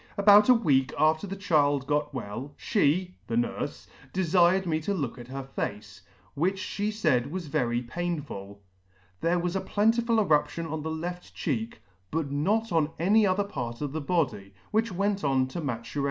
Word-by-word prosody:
About 205 +2 +7
a 250 - +8
week 135 - +2
after 155 +5 +2
the 195 - -5
child 145 -8 +2
got 150 +1 0
well, 130 +2 -6
fhe 180 -2 +1
(the 115 - -2
nurfe) 120 0 -2 0.3
delired 185 +1 +3
me 160 -2 0
to 200 +6 -1
look 135 -7 -3
at 120 - -9
her 135 +1 -5
face, 105 -6 -5 0.3
which 185 +7 0
fhe 205 +2 -2
faid 155 - +1
was 175 +3 -5
very 120 -4 0
painful. 120 - -5 0.6
There 170 +2 +1
was 175 +1 -1
a 195 - 0
plentiful 225 +2 +2
eruption 165 -3 +1
on 160 -1 -4
the 160 - -4
left 175 +3 -5
cheek, 115 -7 -3 0.3
but 155 -3 -2
not 210 +11 0
on 160 -3 +2
any 205 +5 +4
other 190 +2 +2
part 125 -12 -5
of 145 -2 -3
the 160 +2 -3
body, 130 - -1 0.2
which 220 0 +1
went 200 +2 -1
on 135 -2 +2
to 170 - -5
maturation. 125 -1 -4
160 Hz, 175 wpm, -27 LUFS, 135-190 Hz, 0.6 s, a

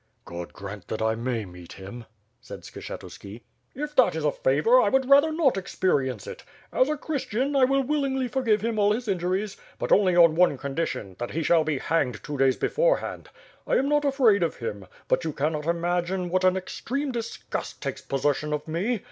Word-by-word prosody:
"God 85 0 -7
grant 100 -1 -9
that 110 - -4
I 110 0 +2
may 115 -1 -2
meet 90 -2 -12
him!" 100 +5 -9 0.4
said - - -9
Skshetuski. 105 +4 -9 0.3
"If 295 +2 -5
that - - +5
is - - -2
a - - +3
favor, - - +3
I - - +2
would 265 -1 +2
rather 285 +3 +6
not 310 -8 +2
experience 135 - -1
it. - - -9 0.3
As 255 - +3
a 305 - -1
Christian, 275 -2 -2
I 265 -2 +6
will 275 +1 +2
willingly 270 -2 0
forgive 235 -5 +1
him 225 -1 -1
all 205 0 +4
injuries; 200 -2 -2 0.2
but - - -4
only 185 -3 +4
on 170 -2 +7
one 170 -4 +3
condition, 135 - -4
that 120 - -3
he 165 - -2
shall 165 0 +4
he 155 -3 0
hanged 130 -6 -1
two 150 - -5
days 135 -1 +4
before - - +2
hand. - - -7 0.4
I - - +2
am 270 - +2
not 295 0 +2
afraid 260 -8 +3
of 165 -3 0
him, 105 -5 -6 0.2
but 175 - +1
you 160 -2 -3
cannot 150 +2 -2
imagine 175 +2 -1
what 185 0 +1
an 185 0 +4
extreme 270 +9 -3
disgust 230 -2 -5
takes - - -4
possession 145 +2 -1
of 150 +1 -3
me. 195 +9 -1
180 Hz, 195 wpm, -26 LUFS, -, 0.4 s, on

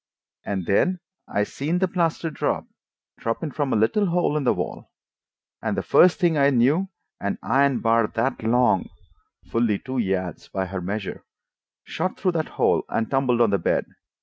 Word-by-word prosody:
And 95 -3 -3
then 185 - +2 0.3
I 105 - 0
seen 150 +10 -2
the 190 +1 +2
plaster 170 -2 -1
drop, - - -1 0.5
droppin' 115 +7 -2
from 140 -1 -2
a - - +2
little 115 - +2
hole 175 -3 +1
in 150 -3 -1
the - - +4
wall. - - -5 0.7
And - - -2
the - - -1
first 180 0 +5
thing 170 -5 +2
I 140 0 +5
knew, 140 +9 +3 0.3
an 100 - -2
iron 140 -1 +2
bar 115 -1 +3
that 115 +6 -2
long" 115 -4 +2 0.6
(fully 115 -3 +2
two 130 +2 -4
yards 95 -5 -2
by 95 -1 -3
her 95 0 -5
measure) 100 +3 -4 0.6
"shot 185 - -3
through 185 - +1
that 160 -2 -1
hole - - +3
and 115 - -1
tumbled 130 -3 +2
on 115 -3 +4
the 100 - +2
bed. - - 0
125 Hz, 175 wpm, -24 LUFS, 105-160 Hz, 0.7 s, first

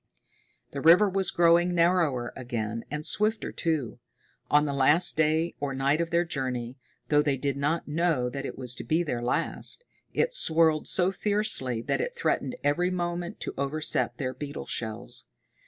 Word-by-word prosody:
The 140 - -5
river 175 +7 +6
was 190 -1 +1
growing 175 +1 +3
narrower 165 -8 +2
again, 115 -3 -4
and 150 +1 -4
swifter, 215 +2 0
too. 155 -9 -2 0.5
On 150 0 +4
the 140 - -2
last 145 +6 +4
day, 160 +2 +1
or 140 -2 -3
night, 140 +4 +1
of 170 - -2
their 170 +1 +2
journey 130 -4 -4 0.3
though 150 -1 +4
they 145 -2 0
did 140 +1 -2
not 150 +4 -1
know 155 -4 +1
that 135 +3 -5
it - - -6
was 125 -2 -3
to - - -5
be 165 +2 +1
their 125 -7 -3
last 125 - -2 0.3
it - - 0
swirled 160 - +3
so 185 0 +1
fiercely 195 - 0
that - - -1
it 485 +1 -4
threatened 460 - -1
every 160 +5 +2
moment 175 -1 -3
to - - -4
overset 150 +3 -1
their 130 -2 -3
beetle 145 +1 -6
shells. 110 -2 -3
155 Hz, 170 wpm, -27 LUFS, 135-175 Hz, 0.5 s, river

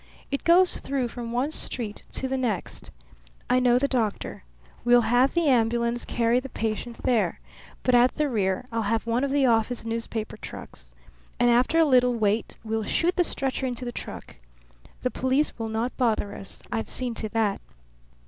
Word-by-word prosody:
It 275 - -2
goes 355 +2 +4
through 265 -3 -2
from 235 -1 -6
one 255 +5 0
street 225 -8 -3
to 265 - -2
the 265 - -1
next. 240 -7 -3 0.6
I 250 - +5
know 245 -1 +4
the 280 +3 +2
doctor. 225 - -2 0.4
We'll 240 0 +6
have 245 +5 +3
the 340 -1 +2
ambulance 235 -1 +2
carry 235 +1 +2
the 270 +1 -8
patient 225 +1 -4
there, 235 -4 +1 0.4
but 255 - +2
at 245 +1 +5
the 300 - +1
rear 195 -5 0
I'll 230 0 -1
have 225 0 0
one 235 +3 0
of 280 - 0
the 280 0 +2
office 230 0 +1
newspaper 230 -1 -3
trucks. - - -9 0.5
And 240 0 +4
after 250 +7 +3
a 325 - +6
little 250 -3 +4
wait 215 0 0
we'll 220 -1 -2
shoot 345 - +1
the 355 - +3
stretcher 265 -4 -2
into 250 0 -4
the 240 - -3
truck. - - -8 0.7
The 250 - 0
police 260 +1 0
will 225 -1 -3
not 225 +3 -2
bother 220 -5 +1
us. 195 - -9
I've 225 - -2
seen 250 -2 +2
to 220 -1 -3
that. 215 -3 +1
240 Hz, 180 wpm, -26 LUFS, 225-260 Hz, 0.7 s, We'll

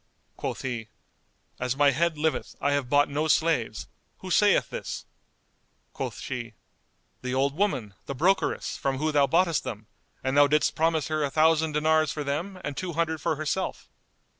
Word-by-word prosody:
Quoth - - -4
he, 120 -4 -3 0.7
"As 125 +1 -1
my 145 -1 +5
head 165 +3 0
liveth, 155 +1 -1
I 145 - +1
have 140 -3 0
bought 145 +1 +4
no 150 +2 -1
slaves! 150 - +1 0.3
Who - - -6
saith - - +4
this?" - - -5 0.9
Quoth - - -5
she, 120 -4 -5 0.7
"The 125 0 -3
old 140 +1 +1
woman, 140 - 0
the 140 - -4
brokeress, 185 +8 +1
from 135 -3 -1
whom 155 +3 0
thou 145 -2 +4
boughtest 170 +1 +2
them; 110 -1 -6 0.4
and 130 +1 0
thou 145 0 +7
didst 150 +1 +2
promise 160 -1 +1
her 155 -1 0
a 140 - 0
thousand 160 +1 +3
dinars 155 0 +3
for 150 - -4
them 170 +7 -3
and 145 - -4
two 180 +2 -4
hundred 160 -1 -1
for 155 - 0
herself." 155 +5 -3
150 Hz, 170 wpm, -27 LUFS, 135-160 Hz, 0.9 s, thou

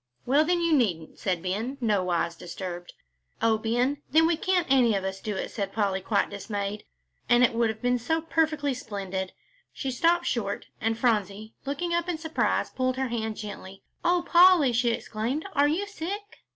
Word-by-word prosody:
"Well, 280 +4 +4
then, 345 +2 +1
you 335 -1 +2
needn't," 185 - 0
said 180 -3 -1
Ben, 220 +9 -2
nowise 185 -7 0
disturbed. 175 0 -7 0.5
"Oh, 225 -1 +2
Ben, 245 +6 0
then 320 +3 +5
we 335 0 +3
can't 360 +1 +1
any 250 -5 +4
of 195 - -1
us 190 0 -4
do 210 -2 -3
it," - - -4
said 200 -3 -3
Polly, 195 -3 0
quite 200 +2 0
dismayed, 200 0 -4 0.4
"and 240 0 +6
it 240 - +4
would 230 -1 +2
have 220 +1 -6
been 245 0 +2
so 320 +8 0
perfectly 310 -3 0
splendid." 195 -5 -4 0.4
She 270 - -4
stopped 335 +7 +2
short, 205 -5 -2 0.2
and 225 +1 0
Phronsie, 215 -2 0
looking 340 +5 -2
up 345 +1 0
in 345 - -1
surprise, 320 0 0
pulled 255 0 -1
her 265 -1 -1
hand 220 -2 -3
gently. 195 -2 -8 0.2
"Oh, 350 0 +2
Polly," 345 -7 +6
she 240 +1 +2
exclaimed, 235 - -2
"are 290 -1 +4
you 335 +7 0
sick?" 405 +1 -6
240 Hz, 180 wpm, -27 LUFS, 200-310 Hz, 0.5 s, and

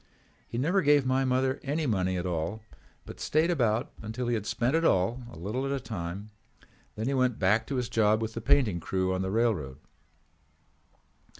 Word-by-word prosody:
He 115 - -5
never 170 +10 +2
gave 145 -3 +4
my 130 +1 +2
mother 130 +1 +1
any 150 +3 -1
money 95 -6 0
at 90 - -3
all 90 +5 -3 0.4
but - - -10
stayed 160 +3 +2
about 120 -5 +1
until 110 +3 -4
he - - +1
had 105 -3 -2
spent 125 +5 0
it 165 - +2
all, 105 - +2
a - - -11
little 105 +10 -3
at 135 - -2
a 140 - 0
time. 100 -3 -6 0.6
Then 110 - -3
he 135 - 0
went 130 -3 +1
back 105 +4 +2
to 140 - -3
his 125 -2 -1
job 110 -2 +3
with 110 0 -3
the 115 - -5
painting 110 -6 +3
crew 95 +2 -1
on 95 - -1
the 95 - -2
railroad. 95 - 0
115 Hz, 195 wpm, -28 LUFS, 95-130 Hz, 0.6 s, gave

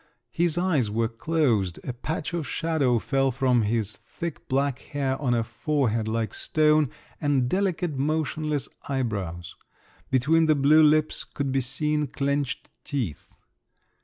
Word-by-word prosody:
His 170 -1 +1
eyes 165 - +2
were 115 +2 +1
closed, 115 - 0
a 125 - -4
patch 150 +6 -4
of 170 -4 -2
shadow 155 -7 +1
fell 135 +3 +1
from 130 -2 +2
his 110 -1 -1
thick 170 +10 -7
black 135 0 0
hair 135 -2 -2
on 125 -4 +2
a 115 - +1
forehead 115 -5 -1
like 110 0 -1
stone, 155 -2 +3 0.3
and 140 -4 +2
delicate, 180 -1 0
motionless 150 0 -1 0.2
eyebrows; 100 - -3 0.5
between 155 +6 +3
the 155 - +5
blue 145 +3 +5
lips 155 0 +3
could 140 -2 -3
be 135 0 +1
seen 150 +3 -1
clenched 140 0 -2 0.2
teeth. 120 - -4
140 Hz, 135 wpm, -26 LUFS, 120-155 Hz, 0.5 s, the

